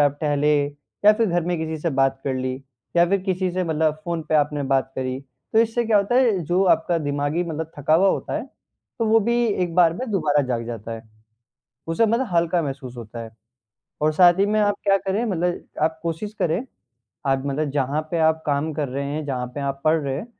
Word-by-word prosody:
आप 145 0 +2
टहले 150 0 +2 0.5
या 210 - +9
फिर 225 +1 +1
घर 175 -2 +1
में 175 0 -1
किसी 160 0 -3
से 170 - 0
बात 135 0 +2
कर 135 -2 -1
ली 130 0 -2 0.4
या 170 0 +6
फिर 200 0 +2
किसी 185 -1 -1
से 185 +1 -1
मतलब 155 -2 +1
फ़ोन 170 -2 -2
पे 155 - +1
आपने 145 -1 +2
बात 135 0 +1
करी। 130 0 -3 0.3
तो 220 - +4
इससे 230 +1 +2
क्या 220 -2 +4
होता 200 +4 +1
है 245 -6 +4
जो 180 +4 +2
आपका 165 +1 -1
दिमागी 145 +3 -1
मतलब 160 -1 -4
थका 150 +2 +2
हुआ 195 +4 +5
होता - - -1
है - - -7 0.5
तो 230 - +1
वो 225 +1 +5
भी 240 0 +2 0.2
एक 170 -2 -2
बार 170 -2 +5
में 250 +3 -5
दोबारा 150 -7 +2
जाग 120 -2 -2
जाता 115 -1 -6
है। 115 - -7 0.9
उसे 165 +8 +2
मतलब 235 +4 +1
हल्का 170 +1 +2
महसूस 135 -3 -6
होता 115 0 -8
है 115 - -9 0.7
और 155 +1 +3
साथ 175 +2 +6
ही 200 - +4
में 215 +1 +1
आप 205 -1 +2
क्या 195 0 +4
करें 195 +4 -1
मतलब 180 -4 -1 0.2
आप 160 0 +1
कोशिश 170 +6 -3
करें 165 +3 +1 0.7
आप 135 -1 +1
मतलब 145 +1 -1
जहाँ 140 +1 0
पर 170 - 0
आप 160 0 -1
काम 145 +2 0
कर 145 -2 -2
रहे 140 +2 -3
हैं, 150 +2 -3
जहाँ 125 -3 -2
पर 145 - -4
आप 140 0 -3
पढ़ 160 +1 +4
रहे 140 -2 -2
हैं, 205 - -5
160 Hz, 225 wpm, -23 LUFS, 140-185 Hz, 0.9 s, या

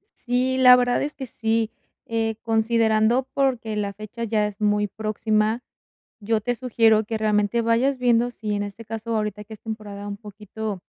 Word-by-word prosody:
Sí, 255 +1 0
la 250 -1 +9
verdad 245 0 +2
es 290 0 -3
que 270 - -6
sí, 225 -1 -1 0.3
eh, 225 -1 -1
considerando 225 +2 +2
porque 250 -6 0
la 200 -1 -2
fecha 215 +3 -7
ya 215 -2 +1
es 205 0 -9
muy 210 0 +2
próxima, 215 +2 -1 0.6
yo 220 +1 0
te 245 +3 -1
sugiero 225 -3 +3
que, 225 +1 -3
realmente, 215 +2 +1
vayas 245 +4 +2
viendo 245 -1 +3
si, 215 -3 -5
en 205 - -1
este 205 +3 -7
caso, 225 +1 -4
ahorita 210 -1 -2
que 220 +1 -10
es - - -15
temporada 210 -2 -7
un 200 - -5
poquito, 210 -2 -7
220 Hz, 175 wpm, -23 LUFS, 210-235 Hz, 0.6 s, la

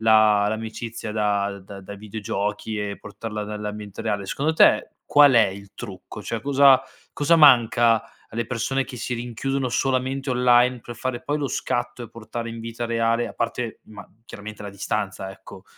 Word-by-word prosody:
la 110 -2 +5
l'amicizia 110 +1 -5
da 100 -2 0
da 100 +1 -10
da 100 +2 -8
videogiochi 105 +1 -4
e 105 -1 -4
portarla 105 0 -6
dall'ambiente 105 -1 -6
reale. 105 -3 -2
Secondo 150 +10 -1
te, - - +5
qual 145 -1 +6
è 115 -4 +6
il 100 +1 -10
trucco? 100 +2 -9
Cioè, 115 +1 -3
cosa 135 +1 +5 0.3
cosa 160 +3 +3
manca 120 -6 +6 0.3
alle 115 +1 -3
persone 130 +3 -1
che 130 0 -9
si 125 +1 -4
rinchiudono 125 +3 -2
solamente 130 +2 0
online 125 0 +4
per 120 - -9
fare 125 +1 -3
poi 145 - -1
lo 145 - -1
scatto, 120 0 -2
e 120 - -8
portare 115 +1 -6
in 115 0 -7
vita 115 +1 -4
reale 115 0 +1
a - - -11
parte, 115 0 -3
ma 105 -2 -11 0.2
chiaramente 105 -1 -9
la 100 - -6
distanza, 100 -1 -3
ecco? 95 0 -13
115 Hz, 165 wpm, -24 LUFS, 105-125 Hz, 0.3 s, qual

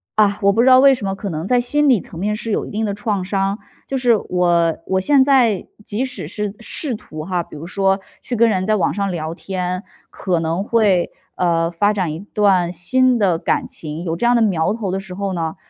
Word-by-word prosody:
啊， 205 -1 +3
我 200 - +4
不 225 - +3
知 255 - +3
道 255 0 +8
为 275 0 +7
什 210 - -6
么， 195 - -1
可 200 0 -5
能 160 0 -4
在 245 +1 +3
心 295 +4 +3
理 240 -7 +4
层 165 - -12
面 210 +3 -1
是 225 +1 -4
有 - - -1
一 - - -9
定 220 +1 -2
的 200 - -2
创 205 -2 -2
伤。 195 +1 -1 0.3
就 270 - -2
是 245 -3 +3
我 175 -3 +1
我 190 0 +1
现 270 +6 +4
在 245 -8 +2 0.2
即 220 +5 -2
使 260 - -6
是 210 -1 -4
试 250 +3 -3
图 155 -7 -9
哈， 175 -1 -2
比 - - -14
如 165 +3 -8
说 195 +1 +1 0.2
去 245 - -3
跟 230 0 +4
人 185 -3 0
在 215 +1 +2
网 185 - +1
上 200 -2 -2
聊 160 -2 -4
天， 185 0 -4 0.3
可 180 -3 -2
能 165 +3 -1
会， 205 -5 +2 0.2
呃， 165 -2 +1
发 205 +5 +1
展 185 -6 -1
一 160 - -6
段 195 -4 +1
新 245 +9 +2
的 185 -5 +2
感 255 - -1
情， 155 -5 -7
有 165 -2 -2
这 205 - -2
样 245 +1 +4
的 235 - +3
苗 190 -3 +1
头 220 -4 -4
的 190 - -2
时 190 -1 -9
候 195 0 -3
呢， 165 -2 -3
200 Hz, 255 characters per minute, -19 LUFS, 180-225 Hz, 0.3 s, 道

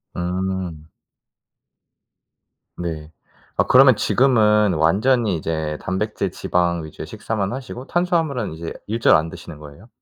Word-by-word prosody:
음. 90 -3 -3 1.9
네. 80 -3 -5 0.4
아, - - +3
그러면 130 -1 +7
지금은 105 -6 +3
완전히 105 +6 +2
이제 80 -1 -3
단백질 100 0 -2
지방 85 -3 0
위주의 80 - -9
식사만 100 -2 -3
하시고 130 0 -7
탄수화물은 165 - 0
이제 80 +1 -6
일절 115 +2 +4
안 80 +1 +1
드시는 80 -1 -10
거예요? 75 +8 -13
95 Hz, 265 characters per minute, -21 LUFS, 80-115 Hz, 1.9 s, 그러면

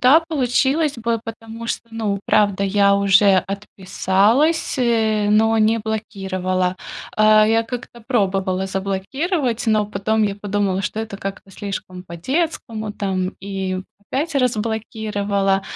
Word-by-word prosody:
да, 275 +6 +7
получилось 275 0 +1
бы, 230 -1 -1
потому 225 0 -8
что, - - -2
ну, 210 -3 -2
правда, 205 -2 +3
я 200 0 +4
уже 200 0 +5
отписалась, 200 - +1
э, 220 -4 +2
но 220 +1 +4
не 220 +1 +3
блокировала. 190 -4 -2 0.4
Э, 215 0 +6
я 225 0 +3
как-то 240 0 -7
пробовала 195 -5 0
заблокировать, 230 - -2
но 215 -1 +2
потом 215 +2 0
я 200 -1 -1
подумала, 200 -1 -1
что 215 - -3
это 220 -3 -6
как-то 195 0 -7
слишком 190 -2 -6
по-детскому 220 - -3
там, 190 -2 -2
и 190 -1 -3 0.2
опять 285 +9 -3
разблокировала. 210 -5 0
210 Hz, 120 wpm, -20 LUFS, 195-230 Hz, 0.4 s, да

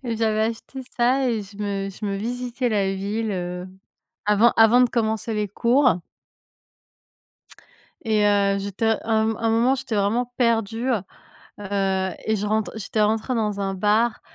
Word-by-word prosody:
J'avais 225 -2 0
acheté 230 +4 -4 0.2
ça 255 +2 +2
et 225 -3 -1
je 200 +1 -14
me 200 -1 -2
je 210 +3 -9
me 200 - -2
visitais 245 +3 -3
la 195 -3 0
ville, 210 +3 -2
heu, 180 0 -4 0.6
avant 210 +3 +4
avant 225 +2 +6
de 245 - +2
commencer 220 -1 -1
les 210 -1 -1
cours 240 - +2 2.0
et 215 -2 +2
heu, 200 -1 +3
j'étais 200 +3 0
un 220 -1 +2
m 220 - -3
un 225 0 0
moment, 235 +4 +3
j'étais 245 -5 -4
vraiment 235 +5 0
perdue, 230 0 0
heu, 230 -7 +1 0.6
heu 190 -1 -1 0.2
et 220 - +1
je 210 +1 -3
rentre 215 0 0
j'étais 215 +1 -1
rentrée 220 +4 0
dans 210 -3 -1
un 195 -1 -2
bar 210 +4 +1
220 Hz, 160 wpm, -23 LUFS, 200-235 Hz, 2.0 s, avant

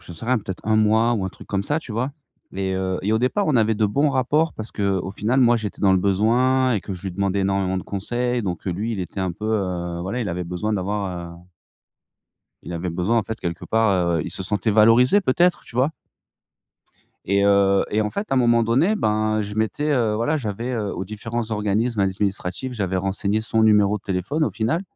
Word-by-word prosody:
j'en 90 -1 -11
sais 80 - -9
rien, 125 +1 +2
peut-être 95 -3 -7
1 110 0 +3
mois 110 +2 +3
ou 100 -4 -1
un 95 - -2
truc - - -13
comme 100 -1 -1
ça, 150 +7 0
tu 130 - -9
vois 125 +6 -2 0.4
et 95 0 -2
heu 95 0 -1
et 105 +3 0
au 110 - +3
départ, 130 - 0
on 140 - +3
avait 110 0 +3
de 110 0 +1
bons 140 +9 +2
rapports 145 +4 +1
parce 110 0 -7
qu'au 95 -2 -1
final, 115 +6 0
moi, 120 -1 +5
j'étais 110 -2 -5
dans 100 -2 +4
le 95 - +4
besoin 120 +7 +2
et 105 - 0
que 95 +2 -6
je 90 - -10
lui 95 - -3
demandais 100 +1 0
énormément 95 -1 0
de 95 - -3
conseils, 120 +5 -2
donc 90 -2 -4
heu, - - 0
lui, 105 +7 -2
il 100 - -3
était 90 +2 -6
un 95 -2 -1
peu, 105 - -9
heu, 90 -5 -2
voilà, 95 +8 -3
il 105 - -2
avait 90 +1 -3
besoin 90 +5 -3
d'avoir, 95 -3 -3
heu - - -12 1.3
il - - -7
avait 85 +1 -3
besoin 95 +8 +1
en - - +1
fait 110 +3 -6
quelque 85 -1 -4
part, 100 -6 +2
heu - - -1
il - - -5
se - - -3
sentait 105 +3 0
valorisé 115 - +5
peut-être, 175 +2 +2
tu 115 - -11
vois 130 +5 +3 1.3
et 100 +1 +2
heu 100 -1 +4
et 105 - +1
en 105 - -2
fait, 200 - -4
à - - +2
un - - +3
moment 120 -1 +4
donné, 135 - +2
ben, 110 - +1
je 105 0 -6
m'étais, 110 +8 -1
heu, 115 -6 +1
voilà, 120 +8 0
j'avais, 115 -2 -4
heu, 105 -4 -2
aux 95 - -4
différents 115 +3 -4
organismes 105 +2 0
administratifs, 95 +4 -2
j'avais 95 -5 -2
renseigné 100 +3 -1
son 110 0 +1
numéro 105 -1 +4
de - - -29
téléphone 100 - -1
au - - -1
final 115 - -1
105 Hz, 230 wpm, -22 LUFS, 95-120 Hz, 1.3 s, moi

